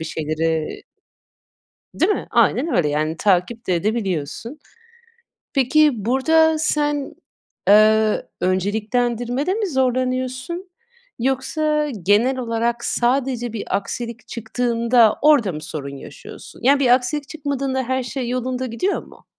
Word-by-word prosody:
bir 160 - -4
şeyleri 160 0 -2 1.2
i - - -13
değil 400 +4 +4
mi? - - -4
Aynen 325 - +2
öyle, 150 - +2
yani, 155 +2 -1
takip 205 +5 0
de 180 - +1
edebiliyorsun. 205 - -2 1.0
Peki, 270 -4 +3
burada 320 +6 +3
sen, 295 -2 0 0.5
eee, 215 +1 +5 0.2
önceliklendirmede 235 - 0
mi 425 -2 -1
zorlanıyorsun? 255 +5 -1 0.5
Yoksa 300 +4 0
genel 230 +7 +3
olarak 235 0 -1
sadece 245 -1 0
bir 220 - -4
aksilik 235 +4 -6
çıktığında 235 0 +2
orada 290 -10 +4
mı 155 -2 -7
sorun 140 -3 -6
yaşıyorsun? - - -12
Ya, 275 +3 +5
bir 265 - +2
aksilik 270 +3 -1
çıkmadığında 275 -3 -2
her 260 +1 -1
şey 250 -1 -4
yolunda 255 +1 -2
gidiyor 255 - -2
mu? - - -18
245 Hz, 120 wpm, -21 LUFS, 215-275 Hz, 1.2 s, eee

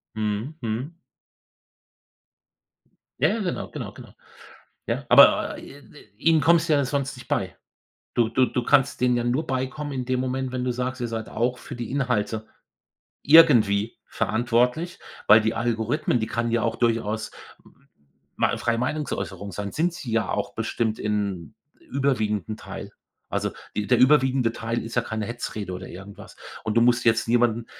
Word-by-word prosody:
Mhm, 110 +6 -2
mhm. 125 +8 -4 2.2
Ja, - - +4
ja, 230 - -1
genau, 185 -5 -3
genau, - - -6
genau. - - -13 0.7
Ja, - - -2
aber, - - +6
äh, 140 - -12 0.4
ihnen 160 +3 +4
kommst 165 +1 +4
du - - +3
ja 140 -1 +2
sonst 140 0 -2
nicht 125 - -13
bei. - - -1 0.6
Du 115 -2 +2
du 130 +3 +3
du 125 - -2
kannst 140 +1 +3
denen 125 -1 +3
ja 120 - -1
nur 125 +6 0
beikommen 135 +3 -3
in 130 -2 -3
dem 130 0 0
Moment, 130 0 -2
wenn 125 -1 -3
du 125 - 0
sagst: 125 +1 -3
„Ihr 120 - -1
seid 115 -1 -5
auch 125 +2 -1
für - - -9
die 120 0 -6
Inhalte 115 -5 -1 0.8
irgendwie 115 -10 +5
verantwortlich.“ 120 +8 0 0.3
Weil 110 +1 +8
die 110 +1 0
Algorithmen, 120 +3 0
die 110 - -1
kann 115 0 -1
ja 115 -1 +1
auch - - -1
durchaus 110 -2 0 0.3
m 140 - -24 0.5
mal - - +1
freie 115 -1 0
Meinungsäußerung 125 -6 -3
sein, 100 +2 -5
sind 170 +3 0
sie 140 -10 -6
ja 115 0 +1
auch 100 - -3
bestimmt 110 0 -2
in 100 -6 -2 0.3
überwiegenden 110 -7 -1
Teil. - - -9 0.4
Also, - - -1 0.3
die 105 - -1
der 125 - +4
überwiegende 130 -3 +4
Teil 115 0 -3
ist 115 0 -7
ja 120 - +2
keine 110 -2 -4
Hetzrede 110 -4 -5
oder 90 +1 -7
irgendwas. 100 +3 -11 0.3
Und 110 - -2
du - - +6
musst 120 +1 +3
jetzt 115 0 +3
niemanden, 120 -1 +2
120 Hz, 165 wpm, -24 LUFS, 110-130 Hz, 2.2 s, Weil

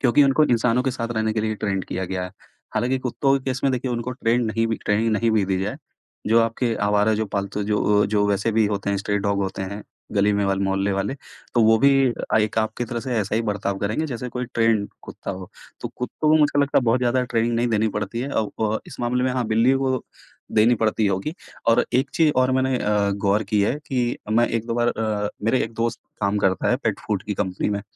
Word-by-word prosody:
क्योंकि 135 +2 +4
उनको 140 +3 +4
इंसानों 125 -1 +2
के 130 - 0
साथ 115 -2 -4
रहने 110 0 0
के 110 - -1
लिए 110 0 -1
ट्रैन्ड 100 -3 -2
किया 95 +1 -3
गया 90 0 -3
है। 90 - -7 0.4
हालाँकि 130 +2 +1
कुत्तों 130 +2 0
के 130 - -16
केस 130 -1 -2
में 135 - +4
देखिए 125 0 -2
उनको 120 +1 -3
ट्रैन्ड 120 -1 0
नहीं 115 +1 0
भी 115 -1 -1
ट्रेनिंग 110 +2 +1
नहीं 115 +2 +2
भी 105 -3 +2
दी 95 -1 0
जाए, 105 - -3 0.5
जो 115 +2 +5
आपके 115 +1 0
आवारा 105 +1 +3
जो 110 0 -1
पालतू 100 +1 -3
जो 105 0 +2
अ, - - +2
जो 105 0 +1
वैसे 100 +3 0
भी 110 0 +3
होते 100 -1 -2
हैं, 100 - 0
स्ट्रे 100 +1 -1
डॉग 100 0 0
होते 95 0 -3
हैं, 100 +2 -6 0.3
गली 105 0 +3
में 100 0 +1
वाले, 95 0 0
मोहल्ले 95 +1 0
वाले 100 +6 -1 0.4
तो 120 - +4
वो 110 0 +6
भी 140 +4 +5 0.2
अ, 110 - -1
एक 105 +1 0
आपके 110 +2 -1
तरह 120 0 -4
से 125 0 -3
ऐसा 100 -1 -1
ही 115 - +1
बर्ताव 100 -2 -2
करेंगे 105 +11 -1
जैसे 125 -3 -5
कोई 125 +1 -4
ट्रैन्ड 115 -3 +2
कुत्ता - - -7
हो। 95 -1 -7 0.3
तो - - -4
कुत्तों 125 +5 -3
को 155 - +6
मुझको 150 -2 +3
लगता 140 0 +3
है - - 0
बहुत 115 +2 +3
ज़्यादा 125 +1 +2
ट्रेनिंग 120 -1 0
नहीं 120 +1 +1
देनी 110 -1 +1
पड़ती 105 +3 -4
है। 130 - -3
अ, - - +1 0.2
व 110 0 0
इस - - -10
मामले 125 +1 0
में 130 - +1
हाँ, 125 -1 -1
बिल्लियों 115 +5 +3
को 130 -2 -1 0.5
देनी 110 +3 +5
पड़ती 110 -1 +1
होगी। 100 - -1 0.3
और 115 +1 +4
एक 130 +3 +2
चीज़ 160 -3 +4
और 130 0 +3
मैंने 130 0 +1
अ, 105 -2 +1
गौर 100 +1 +1
की 105 - +4
है 105 - +1
कि 125 -2 -1
अ, - - -7
मैं 120 +2 +4
1-2 115 0 -2
बार 120 0 +2
अ, 105 -2 -1 0.2
मेरे 120 +3 +2
एक 115 - -8
दोस्त 115 +1 -2 0.2
काम 100 +1 +1
करता 95 +1 +1
है, 125 - +3
पेट 110 -6 -2
फ़ूड 100 -3 -1
की 105 - -4
कंपनी 95 -1 -2
में। 100 0 -2
110 Hz, 245 wpm, -23 LUFS, 105-125 Hz, 0.5 s, वो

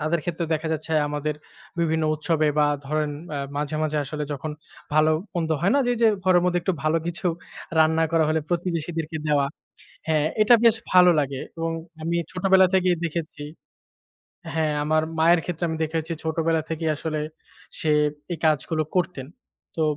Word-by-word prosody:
তাদের 155 +2 0
ক্ষেত্রে 170 -1 -2
দেখা 160 +1 -3
যাচ্ছে 160 +1 -4 0.2
আমাদের 150 0 -2 0.5
বিভিন্ন 160 -1 +1
উৎসবে 155 0 +1
বা 150 - +5 0.2
ধরেন 150 0 0 0.3
আ - - -2 0.2
মাঝে, 150 +1 -2
মাঝে 155 -1 0
আসলে 150 +2 -4
যখন 145 +2 -4 0.4
ভালো 155 +1 +5 0.2
মন্দ 165 -2 -1
হয় 195 +5 +2
না - - +4
যে, 245 - +2
যে, - - +7 0.2
ঘরের 180 -1 +4
মধ্যে 180 0 +2
একটু 190 - +1
ভালো 155 +2 +2
কিছু 170 +1 -3 0.5
রান্না 160 +1 +4
করা 160 -1 +4
হইলে 155 0 +1
প্রতিবেশীদেরকে 165 -2 -2
দেওয়া। 145 -2 +3 0.6
হ্যাঁ, 155 -1 +2
এটা 235 +3 +7
বেশ 230 -1 +6 0.2
ভালো 180 -1 +8
লাগে 135 -2 -2 0.2
এবং 165 0 -1 0.3
আমি 170 +1 -1 0.2
ছোটবেলা 190 0 +4
থেকেই 185 -1 +3
দেখেছি 160 -2 -4 1.1
হ্যাঁ, 155 -2 +1
আমার 155 +1 +2 0.2
মায়ের 165 +1 +5
ক্ষেত্রে 175 -1 -3
আমি 160 - -2
দেখেছি 160 +1 -3
ছোটবেলা 160 0 +1
থেকেই 160 0 -1
আসলে 155 0 -3 0.6
সে 155 - 0 0.4
এই 165 - -4
কাজগুলো 155 +1 +1
করতেন। 175 -7 -1 0.5
তো 160 - 0
160 Hz, 160 wpm, -24 LUFS, 155-170 Hz, 1.1 s, ভালো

